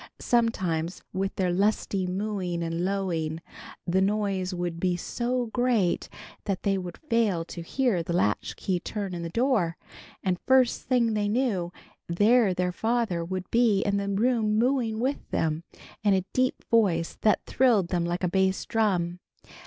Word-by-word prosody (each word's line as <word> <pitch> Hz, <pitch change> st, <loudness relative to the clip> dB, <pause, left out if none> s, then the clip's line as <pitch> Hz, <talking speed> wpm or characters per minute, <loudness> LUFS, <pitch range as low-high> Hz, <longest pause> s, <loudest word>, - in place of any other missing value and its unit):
Sometimes 185 Hz, -8 st, 0 dB
with 195 Hz, +1 st, -2 dB
their 185 Hz, -2 st, +1 dB
lusty 195 Hz, 0 st, +1 dB
mooing 185 Hz, -3 st, -2 dB
and 165 Hz, +1 st, -2 dB
lowing 175 Hz, -5 st, -1 dB, 0.5 s
the 185 Hz, +2 st, +2 dB
noise 195 Hz, -2 st, 0 dB
would 175 Hz, -2 st, -3 dB
be 180 Hz, 0 st, +1 dB
so 245 Hz, +6 st, -2 dB
great 240 Hz, -8 st, +1 dB, 0.4 s
that 195 Hz, -2 st, -2 dB
they 200 Hz, -1 st, +2 dB
would 180 Hz, -2 st, -5 dB
fail 225 Hz, -, 0 dB
to 170 Hz, -, -7 dB
hear 225 Hz, +1 st, 0 dB
the 165 Hz, -, -5 dB
latchkey 175 Hz, -, 0 dB
turn 200 Hz, +1 st, -4 dB
in 175 Hz, -, -4 dB
the 170 Hz, -, -4 dB
door, 215 Hz, -6 st, +1 dB, 0.5 s
and 185 Hz, -2 st, 0 dB
first 260 Hz, -2 st, +4 dB
thing 240 Hz, -3 st, +1 dB
they 210 Hz, -1 st, 0 dB
knew 210 Hz, -7 st, 0 dB, 0.4 s
there 210 Hz, +4 st, +4 dB
their 180 Hz, 0 st, 0 dB
father 220 Hz, -4 st, 0 dB
would 185 Hz, +2 st, -4 dB
be 230 Hz, -4 st, +4 dB
in 200 Hz, 0 st, +1 dB
the 200 Hz, 0 st, -2 dB
room 215 Hz, +1 st, +1 dB
mooing 235 Hz, -2 st, +1 dB
with 265 Hz, +4 st, -2 dB
them, 160 Hz, 0 st, -1 dB, 0.4 s
in 205 Hz, -2 st, +4 dB
a 190 Hz, -1 st, 0 dB
deep 255 Hz, 0 st, 0 dB
voice 185 Hz, -8 st, +2 dB
that 215 Hz, -, +2 dB
thrilled 225 Hz, -9 st, +3 dB
them 175 Hz, -2 st, 0 dB
like 175 Hz, +2 st, -2 dB
a -, -, +3 dB
bass 190 Hz, +1 st, +1 dB
drum. 180 Hz, -6 st, 0 dB
195 Hz, 160 wpm, -27 LUFS, 175-225 Hz, 0.5 s, first